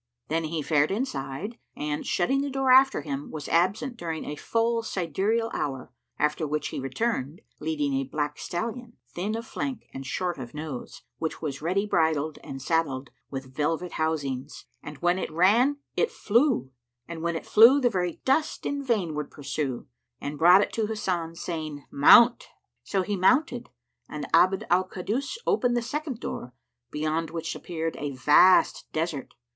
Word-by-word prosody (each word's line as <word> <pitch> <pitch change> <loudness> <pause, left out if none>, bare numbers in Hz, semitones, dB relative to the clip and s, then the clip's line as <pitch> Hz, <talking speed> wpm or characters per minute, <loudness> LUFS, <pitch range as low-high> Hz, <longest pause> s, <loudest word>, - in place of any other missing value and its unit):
Then 160 +1 0
he 155 -1 -3
fared 145 0 +2
inside 195 - -4 0.2
and, 150 0 -3
shutting 265 +10 +1
the 285 - -2
door 270 -1 +1
after 270 +1 +6
him, 140 -1 -5
was 150 -3 -6
absent 200 +9 +1
during 165 -6 -4
a 150 - -4
full 230 +7 0
sidereal 215 +4 -1
hour, 135 -3 -4 0.2
after 150 +1 0
which 150 +1 -2
he - - -5
returned, 145 - -2 0.2
leading 150 -3 -1
a 135 0 +1
black 150 0 -2
stallion, 230 +5 -5
thin 205 +5 -3
of 230 0 -5
flank 265 +2 -4
and 135 - -6
short 175 +4 -2
of 125 +1 -8
nose, 150 -5 -7 0.2
which 160 - -3
was 145 -4 -4
ready 185 +6 0
bridled 160 -5 +1
and 135 -1 -7
saddled, 140 -4 -1 0.2
with 135 -1 -7
velvet 165 +4 -1
housings; 145 -4 -3 0.2
and 150 0 -9
when 175 +1 +3
it - - -3
ran 220 - +4 0.2
it 470 - +2
flew, 235 - +1 0.4
and 170 -1 -6
when 170 0 -1
it 165 - -5
flew, 235 +6 +7
the 255 - +3
very 180 -6 -2
dust 300 +4 +1
in 285 0 -2
vain 210 - 0
would 150 -1 -4
pursue; 140 -3 -4 0.3
and 145 +1 -5
brought 180 +4 +7
it - - -5
to 220 -2 0
Hasan, 180 -6 -2
saying, 155 -4 -5
"Mount!" 235 +12 +7 0.4
So 190 -2 0
he 205 +2 -2
mounted 255 - +2 0.4
and - - -5
Abd 190 +1 +4
al 185 +1 +4
Kaddus 220 - -3
opened 245 - +2
the 240 - 0
second 290 -1 -4
door, 125 - -6 0.3
beyond 155 +2 -1
which 165 0 -4
appeared 165 -2 -4
a 145 -1 -4
vast 150 +8 +5
desert. 155 -4 -3
165 Hz, 165 wpm, -27 LUFS, 150-225 Hz, 0.4 s, flew